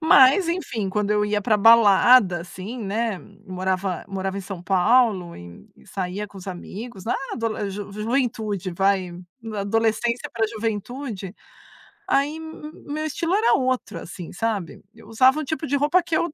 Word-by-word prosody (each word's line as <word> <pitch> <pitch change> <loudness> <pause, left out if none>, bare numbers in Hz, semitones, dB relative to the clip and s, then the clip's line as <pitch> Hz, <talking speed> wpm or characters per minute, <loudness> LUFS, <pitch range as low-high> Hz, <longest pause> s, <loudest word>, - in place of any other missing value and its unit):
Mas 315 +2 +6
enfim, 245 - -2
quando 210 +1 -1
eu 210 0 +2
ia 210 0 0
pra 215 +1 +2
balada, 210 -2 +6
assim, 190 +7 -8
né, 215 0 -2 0.3
morava 185 -1 -2
morava 195 0 -3
em - - -4
São 190 -2 -8
Paulo, 190 -1 +2
e 85 0 -12 0.2
saía 190 +2 -4
com 195 - -12
os 185 - -11
amigos, 195 +3 -8
na 230 - 0 0.2
adole 220 -4 -2
ju 205 +1 -6
ju 210 +1 -6
juventude 220 -6 -1
vai. 185 -1 0 0.4
Adolescência 225 +3 0
pra 225 -1 +1
juventude, 220 -1 -5 0.7
aí 285 +3 +1
m 320 -1 -9 0.2
meu 310 +1 -2
estilo 330 +3 -2
era 440 +3 +3
outro, 255 -1 -1
assim, 175 -3 -9
sabe. 205 -4 -3
Eu 225 - -17
usava 260 +6 +4
um - - -2
tipo 315 +2 -3
de 285 - 0
roupa 295 +6 +3
que 330 -1 -2
eu, 340 -3 -1
215 Hz, 160 wpm, -23 LUFS, 195-255 Hz, 0.7 s, Mas